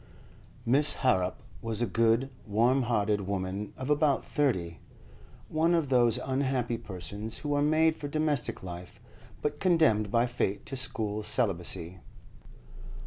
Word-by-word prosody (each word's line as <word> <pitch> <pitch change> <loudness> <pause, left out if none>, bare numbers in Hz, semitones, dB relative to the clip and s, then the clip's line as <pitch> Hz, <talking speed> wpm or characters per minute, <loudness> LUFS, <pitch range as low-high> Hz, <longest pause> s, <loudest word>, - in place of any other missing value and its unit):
Miss 145 +5 +3
Harrop 95 -8 +1 0.2
was 115 -2 -3
a 120 - +2
good, 115 +5 +2 0.2
warm 120 +6 +3
hearted 105 -3 +1
woman 100 +1 -3
of 130 +3 -3
about 145 -2 +2
thirty, 95 - -1 0.7
one 165 +2 +2
of 160 -5 0
those 120 -3 +4
unhappy 130 -3 -1
persons 100 +1 -6
who 145 -1 -3
are 145 - +2
made 155 +2 +3
for 145 - -6
domestic 150 -6 -1
life, 90 0 -8 0.4
but 150 0 -1
condemned 155 - +3
by 115 +3 +3
fate 120 -5 -2
to 135 - -5
school 110 -5 -2
celibacy. 90 -4 0
120 Hz, 135 wpm, -29 LUFS, 105-145 Hz, 0.7 s, those